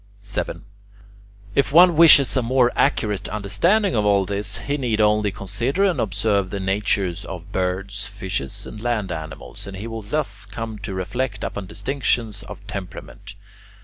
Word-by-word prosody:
7. 100 - -4 0.9
If 140 +3 +2
one 175 +2 +7
wishes 150 -5 +8
a 130 - +3
more 125 +1 +3
accurate 105 -4 +1
understanding 175 - +1
of 105 - +2
all 100 -2 +3
this, 100 +2 -4
he 140 +5 -2
need 120 -6 -1
only 105 -1 +3
consider 105 - -1
and 190 -3 +2
observe 100 -2 0
the 100 - -4
natures 95 -2 0
of 90 0 -8
birds, 100 +2 -2
fishes, 95 -7 -5
and 105 - -9
land 115 -5 -1
animals, 80 +3 -7
and 95 -1 -7
he 100 - -6
will 115 -1 -5
thus 100 -3 -3
come 110 +1 -6
to 100 -1 -5
reflect 100 +4 -3
upon 100 -2 -4
distinctions 120 -4 -1
of 100 0 -10
temperament. 100 -2 -8
105 Hz, 155 wpm, -22 LUFS, 100-120 Hz, 0.9 s, wishes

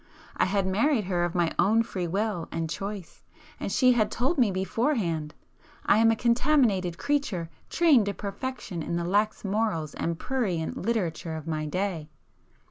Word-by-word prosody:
I - - +2
had 195 0 0
married 220 +6 +2
her 180 -2 0
of 175 - -4
my 175 -2 +2
own 225 +3 +4
free 185 -6 -4
will 195 -1 -1
and 165 -1 -2
choice,—and 195 0 -7
she 255 -3 +5
had 230 -3 +2
told 270 +6 0
me 235 -4 +5
beforehand—"I 190 - -1
am 225 0 +5
a 225 - +3
contaminated 235 - +2
creature, 230 - -1 0.2
trained 295 -11 +4
to 200 - -2
perfection 200 -3 -5
in 170 - -3
the 170 0 -1
lax 210 +4 0
morals 195 -7 -1
and 165 -1 -2
prurient 190 -10 -2
literature 180 -7 -2
of 155 -1 -7
my 155 -2 -2
day." 175 -2 -2
195 Hz, 155 wpm, -27 LUFS, 170-230 Hz, 0.2 s, she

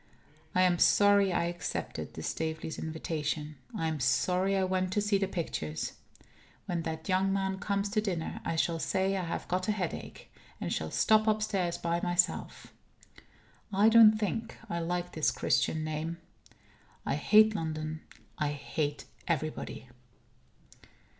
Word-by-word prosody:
I 185 - +5
am 175 -2 +3
sorry 200 -1 +5
I 170 - +1
accepted 170 -3 -4
the 80 - -6
Staveleys' 160 - -3
invitation. 155 -1 -3 0.2
I 165 - 0
am 155 -1 -2
sorry 180 +9 +2
I 190 - +2
went 185 0 0
to 210 - +2
see 205 -1 +2
the 195 - 0
pictures. 80 - -3 0.7
When 175 -2 -2
that 160 -1 -5
young 190 0 +2
man 190 -1 -1
comes 200 0 -1
to 215 +1 +1
dinner, 180 -6 -3
I 165 - -2
shall 165 +1 +1
say 190 +3 0
I 190 - -1
have 170 - -4
got 185 +1 -1
a - - +3
headache, 190 -5 -5 0.3
and - - -2
shall 80 - -2
stop 215 - +3
upstairs 210 -5 +1
by 170 0 -1
myself. 175 0 0 1.0
I 205 +3 +5
don't 220 -1 +8
think 220 +2 -3
I 170 -5 -2
like 175 +1 -2
his 155 - +2
Christian 160 0 +1
name. 155 +2 -3 0.9
I - - 0
hate 215 +9 +5
London. 155 -3 -3 0.4
I 145 -1 0
hate 145 +1 -3 0.2
everybody. 155 -5 -3
175 Hz, 145 wpm, -30 LUFS, 160-195 Hz, 1.0 s, don't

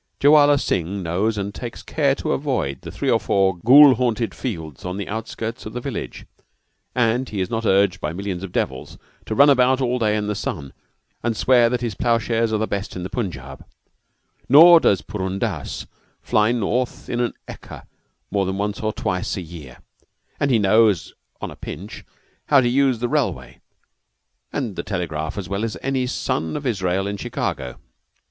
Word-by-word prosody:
Jowala 145 0 +6
Singh 95 0 -2
knows 100 +6 0
and 100 0 -3
takes 120 +1 -7
care 140 -3 +1
to - - -3
avoid 90 - -2
the - - -8
three - - -1
or - - +3
four 95 -2 +1
ghoul 135 +9 +8
haunted 120 -2 -1
fields 80 - -6
on 90 +1 -4
the 100 - -5
outskirts 110 +2 -5
of 110 - -9
the 125 - -3
village; 130 -2 -6 0.7
but 125 +2 +1
he 105 - -4
is 95 +4 -2
not 115 -1 -1
urged 95 -1 +3
by 75 - -2
millions 95 0 -4
of 95 - -6
devils - - -3 0.3
to 110 - -2
run 140 +4 +7
about 130 0 +3
all 125 -1 0
day 110 -2 +1
in 105 - -2
the 105 - -1
sun 70 -8 -5 0.5
and 115 -2 -1
swear 120 -2 +4
that 125 0 -1
his 120 -3 -2
plowshares 115 -1 0
are 110 - +1
the 110 - 0
best 100 -2 -4
in 90 - -5
the 95 - -6
Punjab; 75 - -5 0.9
nor 165 +5 +9
does 100 - +2
Purun 95 -2 -4
Dass - - -3 0.3
fly 105 +2 +2
forth 120 +2 -2
in 120 - -2
an 120 -1 -1
ekka - - -10 0.5
more 100 -2 0
than 95 0 -2
once 105 +1 -2
or 110 0 -1
twice 90 -3 -2
a - - -3
year, 80 -7 -11 0.6
and 145 - +1
he 125 - +4
knows, 105 -3 +3 0.3
on - - -5
a - - -10
pinch, 100 +7 -8 0.4
how 140 - +6
to 125 - +2
use 135 -1 +2
the 120 +2 -2
railway 65 - -2 0.9
and - - -3
the - - -3
telegraph 80 -2 -4
as 95 -4 -4
well 100 +3 -3
as 115 -2 -3
any 130 -2 0
son 80 - -2
of 145 - -7
Israel 95 -5 0
in 100 0 -3
Chicago. 65 -8 -4
110 Hz, 185 wpm, -22 LUFS, 95-125 Hz, 0.9 s, nor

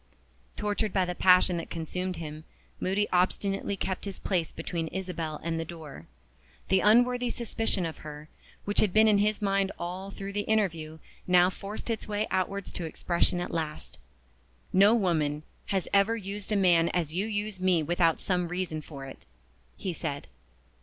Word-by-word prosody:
Tortured 210 -1 -1
by 190 -2 +3
the 180 - -2
passion 180 -1 +5
that 165 - -5
consumed 180 +3 -3
him, 155 -1 -7 0.4
Moody 195 +3 +1
obstinately 195 +2 +1
kept 190 +1 -3
his 200 - -5
place 175 -5 -1
between 165 0 -3
Isabel 170 -4 -4
and 165 0 -1
the - - -1
door. 155 - -9 0.6
The 190 - +5
unworthy 245 +4 +4
suspicion 225 -6 -1
of 160 - -5
her, 150 0 -9 0.4
which 205 - +1
had 200 -4 +2
been 220 +1 +6
in 210 -2 +5
his 210 +1 +1
mind 195 -1 +2
all 180 +3 -5
through 200 0 -6
the 205 - 0
interview, 165 -8 0 0.3
now 180 0 +5
forced 205 +4 -6
its 225 - -3
way 210 0 0
outwards 195 +1 -1
to 175 - -4
expression 170 +2 0
at 175 - -3
last. 155 - -4 0.7
"No 200 +4 +6
woman 155 -8 +1 0.5
ever 200 +3 +4
used 200 0 -6
a - - +3
man 175 -4 +4
as 165 -4 0
you 190 +5 0
use 210 -2 -3
me 180 -3 +3
without 165 +1 +2
some 180 -2 0
reason 175 -3 -3
for 140 -2 -9
it," 135 - -11 0.5
he 185 - -3
said. 145 -4 -4
185 Hz, 165 wpm, -29 LUFS, 165-200 Hz, 0.7 s, been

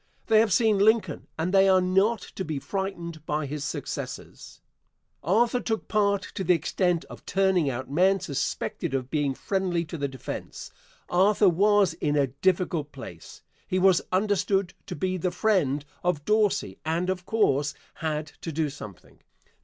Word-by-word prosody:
They 220 - +5
have 220 -1 +3
seen 220 -1 +3
Lincoln 205 -6 +2
and 170 +4 -1
they 195 0 +6
are 190 -1 +6
not 190 +4 +2
to 190 - -7
be 155 -4 -3
frightened 170 -2 -4
by 150 0 -1
his 145 +1 -4
successors. - - -6 0.6
Arthur 230 - +2
took 220 -3 -3
part 200 -2 +1
to 190 - -3
the 180 -1 +4
extent 175 +1 0
of - - -12
turning 190 -6 +2
out 130 0 -4
men 185 +8 +3
suspected 140 -2 -3
of 130 -1 -3
being 145 -3 0
friendly 185 -2 -1
to 165 0 -7
the 140 - 0
defence. 130 -3 -7 0.4
Arthur 195 +2 +4
was 200 +1 +3
in 150 -3 -1
a 145 -1 +3
difficult 165 +2 0
place. 85 -11 -11 0.2
He 185 - 0
was 185 -1 +4
understood 195 -1 +1
to - - -5
be 185 0 -1
the 180 +1 0
friend 165 -10 +1 0.2
of 175 -5 0
Dorsey 210 - +1
and, 165 +3 -1
of 185 -1 -3
course, 145 -10 +1 0.2
had 155 -2 -3
to 165 - -4
do 155 -1 -1
something. 105 -9 -11
180 Hz, 160 wpm, -26 LUFS, 150-195 Hz, 0.6 s, they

